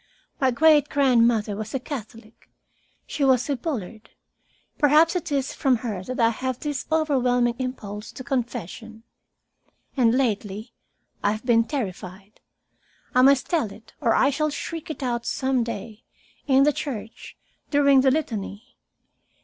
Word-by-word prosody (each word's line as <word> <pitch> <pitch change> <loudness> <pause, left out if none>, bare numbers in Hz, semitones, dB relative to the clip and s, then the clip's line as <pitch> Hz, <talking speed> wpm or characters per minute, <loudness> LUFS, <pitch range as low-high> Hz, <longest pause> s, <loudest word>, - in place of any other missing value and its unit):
My 265 -3 +3
great 295 +3 +4
grandmother 235 -6 +3
was 215 +3 -6
a - - 0
Catholic. 230 -4 -9 0.6
She 290 - -3
was 260 -2 +3
a - - +1
Bullard. 230 - -5 0.7
Perhaps 305 +4 +5
it 350 -4 -3
is 275 -2 -1
from 265 -2 +2
her 200 -5 -3
that 255 +6 -6
I 230 -1 +4
have 255 +2 -4
this 290 -3 -4
overwhelming 250 -6 +2
impulse 210 -5 -5
to 260 - -8
confession. 225 -3 -4 0.9
And 245 -2 +3
lately 215 -3 -2 0.5
I 205 - +2
have 215 +3 -8
been 230 -2 +4
terrified. 195 - -6 0.7
I 255 - +5
must 270 0 +5
tell 315 - 0
it, 215 - -15
or 235 -5 +2
I 275 - +4
shall 305 +2 0
shriek 330 +2 -6
it 310 - -5
out 240 -2 -2
some 260 -2 0
day, 220 0 -7 0.4
in 270 -1 +5
the 295 +1 +3
church, 230 -7 -7 0.3
during 280 -2 +5
the 265 - +4
Litany. 240 -5 -4
250 Hz, 145 wpm, -24 LUFS, 220-280 Hz, 0.9 s, Perhaps